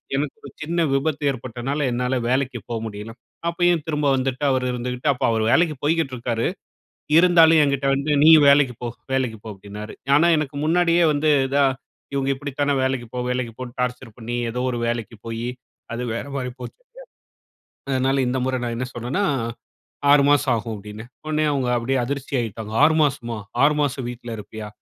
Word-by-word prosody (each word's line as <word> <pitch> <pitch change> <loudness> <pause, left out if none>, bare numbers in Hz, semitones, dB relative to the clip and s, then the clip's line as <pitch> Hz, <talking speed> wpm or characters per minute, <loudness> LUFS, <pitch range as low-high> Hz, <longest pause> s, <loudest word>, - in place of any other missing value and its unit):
எனக்கு 145 0 -2
ஒரு 140 - -8
சின்ன 170 +3 -2
விபத்து 145 +2 0
ஏற்பட்டனால, 130 +3 -4
என்னால 125 +2 -1
வேலைக்கு 130 -1 0
போ 120 - -2
முடியல. 105 +1 -7 0.4
அப்பயும் 175 -2 +2
திரும்ப 150 -2 -1
வந்துட்டு 130 +1 -2
அவரு 130 -1 0
இருந்துகிட்டு, 125 +2 -4
அப்ப 125 - -6
அவரு 110 -1 +1
வேலைக்கி 165 -2 +3
போய்க்கிட்டு 160 -3 +1
இருக்காரு, 115 -1 -1 0.7
இருந்தாலும் 165 -2 +6
என்கிட்ட 140 -1 0
வந்து 140 +2 -2
நீயும் 155 -2 +8
வேலைக்கு 140 -3 +5
போ 120 - -2 0.3
வேலைக்கு 125 -4 -1
போஅ, 105 - -6
ப்டின்னாரு. 105 +2 -9 0.2
ஆனா, 165 +4 +4
எனக்கு 145 -2 -4
முன்னாடியே 170 +1 +3
வந்து 150 +1 +1 0.2
இதா 140 +1 +3 0.5
இவுங்க 135 -1 0
இப்பிடித்தான 145 +1 -2
வேலைக்கு 130 -2 -1
போ! 125 - -2 0.2
லைக்குபோன்னு 120 0 -6
டார்ச்சர் 125 -2 -3
பண்ணி, 120 0 -5
எதோ 120 +2 -3
ஒரு 120 - -3
வேலைக்கு 115 -1 -3
போயி, 115 +1 -4 0.4
அது 120 +1 -3
வேறமாரி 135 +1 -4
போச்சு. 125 - -9 1.1
அதனால 135 +1 +1
இந்த 125 +1 0
முற 130 0 0
நான் 120 -1 -2
என்ன 130 - -2
சொன்னன்னா, 125 - -2 0.9
6 145 -1 +6
மாசம் 145 -3 +3
ஆகும் 110 0 -4
அப்டின்னே. 105 +2 -9 0.2
உடனே 155 0 0
அவுங்க 135 -3 0
அப்டியே 130 +3 0
அதிர்ச்சியாகிட்டாங்க. 120 -6 -3
6 160 +1 +5
மாசமா? 120 -5 -2 0.3
6 150 +1 +3
மாசம் 135 -3 -1
வீட்ல 120 -1 -7
இருப்பியா? 105 +1 -8
130 Hz, 160 wpm, -22 LUFS, 120-145 Hz, 1.1 s, நீயும்